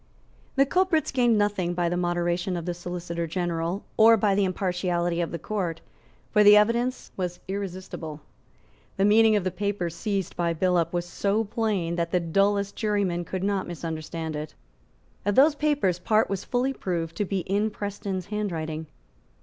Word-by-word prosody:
The 275 0 +5
culprits 360 +1 +1
gained 240 -4 +3
nothing 200 -4 0
by 175 -1 +1
the 175 - 0
moderation 175 +1 0
of 170 - -5
the 175 - -1
Solicitor 175 -1 -4
General 175 +2 -2
or 225 +1 +7
by 205 -1 +2
the 200 0 +2
impartiality 175 -2 -1
of 170 - -1
the 170 - -4
Court; 175 -2 -3 0.5
for 210 -1 +5
the 205 0 +9
evidence 235 +4 +1
was 180 -2 -3
irresistible. 185 -5 -5 0.8
The 195 - +3
meaning 220 +1 +5
of 205 - +1
the 185 - -1
papers 185 -3 -2
seized 195 0 -2
by 170 -1 0
Billop 175 -1 +1
was 175 -1 -1
so 200 +4 0
plain 205 -6 -1
that 170 0 0
the 180 - +2
dullest 200 +4 +1
juryman 200 -5 0
could 185 +2 -4
not 200 -1 0
misunderstand 160 -1 -5
it. 150 +1 -6 0.7
Of 205 0 0
those 290 +3 +6
papers 290 - +1
part 215 -2 +2
was 195 -1 -2
fully 255 +2 0
proved 170 -7 -3
to 205 - 0
be 195 0 -1
in 200 +5 0
Preston's 200 -3 -4
handwriting. 160 -7 -3
185 Hz, 165 wpm, -26 LUFS, 175-210 Hz, 0.8 s, the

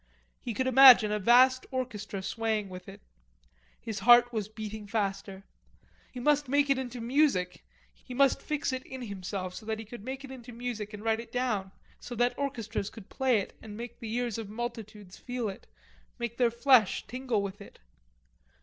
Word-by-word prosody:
He 230 - -5
could 260 - 0
imagine 255 -4 +8
a 210 - 0
vast 255 +5 +5
orchestra 215 -7 -4
swaying 220 -1 -2
with 185 0 -9
it. - - -13 0.8
His 220 -3 -5
heart 240 +3 +6
was 215 -2 -2
beating 215 -1 -7
faster. 195 -2 -3 0.7
He 250 - -8
must 290 +1 +2
make 285 0 +3
it 270 - +2
into 250 -1 -5
music; 235 -7 +1 0.4
he 250 - -8
must 275 +1 +3
fix 295 -3 -2
it 260 0 -4
in 260 -1 -8
himself, 190 -3 -5
so 220 - -9
that 220 0 -1
he 220 - -8
could 220 0 -10
make 265 +3 -6
it 265 - -11
into 245 -2 -10
music 230 -3 -5
and 210 - -10
write 225 0 +1
it 230 - -9
down, 220 -7 -1 0.3
so 245 - -8
that 240 +1 +1
orchestras 230 -7 -3
could 210 -2 -13
play 260 -3 +2
it - - -9
and 210 -1 -9
make 235 0 -8
the 225 -2 -6
ears 240 -3 -2
of 215 -3 -6
multitudes 215 -4 -7
feel 245 -2 -3
it, 195 - -8 0.5
make 235 -1 -4
their 245 -2 +4
flesh 235 -3 +3
tingle 250 -4 -2
with 200 +1 -6
it. 200 - -13
230 Hz, 185 wpm, -29 LUFS, 210-255 Hz, 0.8 s, imagine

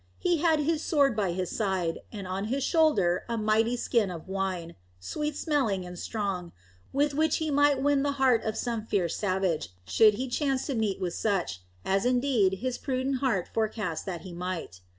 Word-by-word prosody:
He 350 -1 +1
had 320 -1 +3
his 315 +1 0
sword 280 -7 +3
by 200 -4 0
his 180 0 -3
side, 190 -6 0
and 200 -4 -6
on 190 +2 -2
his 265 +5 -1
shoulder 240 - +3
a 230 - -1
mighty 220 +3 +2
skin 230 -4 +1
of 170 -1 -7
wine, 190 -3 -3 0.3
sweet 300 - -3
smelling 255 - 0
and 180 -1 -8
strong, 195 -6 -3 0.4
with 290 +1 +1
which 315 +2 +2
he 315 -1 -2
might 285 -1 +3
win 285 -1 +3
the 285 0 0
heart 265 -4 +3
of 220 0 -2
some 230 -3 -2
fierce 190 -6 0
savage, 185 - 0 0.2
should 215 - +5
he 260 +4 -3
chance 270 +1 0
to 280 - -2
meet 220 -5 0
with 180 -3 -2
such, 190 - -1 0.2
as 195 +1 +2
indeed 245 -7 +2
his 255 -1 -1
prudent 260 0 -1
heart 235 -10 0
forecasted 215 -7 -2
that 170 -2 -6
he 185 - -9
might. 170 - -5
220 Hz, 190 wpm, -28 LUFS, 185-275 Hz, 0.4 s, should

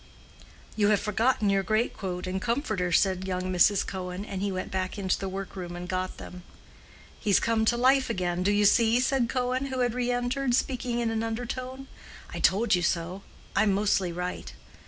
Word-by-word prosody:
"You 210 -2 +3
have 210 -1 +4
forgotten 215 0 +1
your 195 0 +2
greatcoat 195 -4 -2
and 185 +1 -3
comforter," 220 - -1
said 190 +1 +2
young 185 0 -2
Mrs. 190 +3 +4
Cohen, 185 +1 -5
and 190 -2 -5
he 200 0 -1
went 185 0 -4
back 185 +1 -2
into 190 -2 0
the 195 - -3
workroom 185 -2 -6
and 175 0 -6
got 185 0 -3
them. 180 0 -9 0.8
"He's 200 -3 +3
come 225 -1 +1
to 240 - +2
life 260 +2 +3
again, 180 -4 -1
do 195 +3 +2
you 205 0 +3
see?" 230 +3 +4
said 255 -1 +1
Cohen, 255 +1 -1
who 260 -1 -2
had 245 -2 +1
re 250 0 -1
entered—speaking 245 0 0
in 235 -1 0
an 225 0 -1
undertone. 250 +3 -4 0.5
"I - - -4
told 220 +5 +3
you 180 - +3
so: 175 +2 -1 0.3
I'm 200 0 +3
mostly 195 -2 +1
right." 180 +1 -5
205 Hz, 180 wpm, -27 LUFS, 185-240 Hz, 0.8 s, have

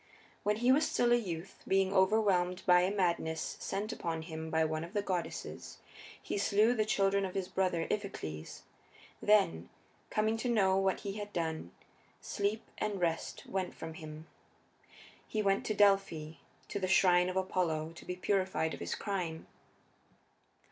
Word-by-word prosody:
When 210 +1 +1
he 240 +4 +3
was 290 +4 +4
still 240 0 +2
a - - +7
youth, 185 -6 -4
being 195 0 +2
overwhelmed 190 -2 +3
by 180 -1 +6
a 185 +2 +1
madness 170 -5 0
sent 210 +3 -3
upon 165 -1 -3
him 160 -1 -6
by 160 0 +2
one 155 0 -2
of 170 +4 -9
the 205 -2 0
goddesses, 180 -4 -4 0.4
he - - -3
slew 210 +4 +4
the 215 -3 +1
children 200 -1 +2
of 190 -1 -4
his 190 -2 -1
brother 180 -4 0
Iphicles. 80 - -5 0.6
Then, 195 - +3 0.4
coming 220 +1 +1
to 245 +2 -2
know 195 -5 +3
what 195 0 +1
he 200 0 -4
had 205 0 -6
done, 160 - -2 0.5
sleep 205 +2 -2 0.2
and 205 -2 -1
rest 165 -2 -2
went 190 -1 -3
from 160 0 -7
him: 155 -1 -9 1.0
he 215 -1 -1
went 195 0 +1
to 215 - 0
Delphi, 195 -7 +2 0.3
to - - -2
the 185 - -1
shrine 180 -1 +5
of 185 - -4
Apollo, 165 -4 0
to 165 - -12
be 180 - -4
purified 185 -3 0
of - - -7
his - - -3
crime. 180 -6 -3
190 Hz, 160 wpm, -33 LUFS, 165-205 Hz, 1.0 s, a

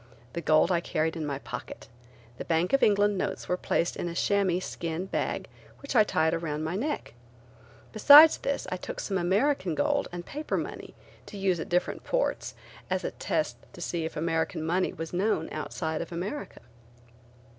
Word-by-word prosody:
The 170 - -3
gold 155 +3 +4
I 175 - +3
carried 160 -1 -1
in 155 -2 -3
my 140 -1 -2
pocket. - - -8 0.5
The - - -5
Bank 170 +5 +1
of 275 - +4
England 205 -1 +3
notes 195 0 -3
were 180 - +1
placed 170 -1 0
in 175 - -3
a 170 - -7
chamois 195 -2 +2
skin 170 -1 -4
bag - - -2 0.3
which 280 -1 -6
I 215 - +7
tied 160 -5 +1
around 155 -2 -2
my 160 +3 -2
neck. 285 - -3 0.8
Besides 290 +8 +9
this 280 - -2
I 185 - -1
took - - -7
some 195 -2 -1
American 190 - +1
gold 145 - +1
and 175 0 -6
paper 300 +2 -3
money - - -6 0.3
to 205 - -9
use 190 -3 +1
at - - -5
different 180 0 0
ports - - -1 0.3
as - - -1
a - - -2
test - - -2 0.2
to - - -12
see 170 -2 -2
if 160 - -5
American 160 0 -1
money 180 +3 +1
was 165 +1 -7
known 180 -3 0
outside 160 +1 -3
of 170 - -7
America. 190 +12 -5
175 Hz, 180 wpm, -28 LUFS, 160-205 Hz, 0.8 s, Besides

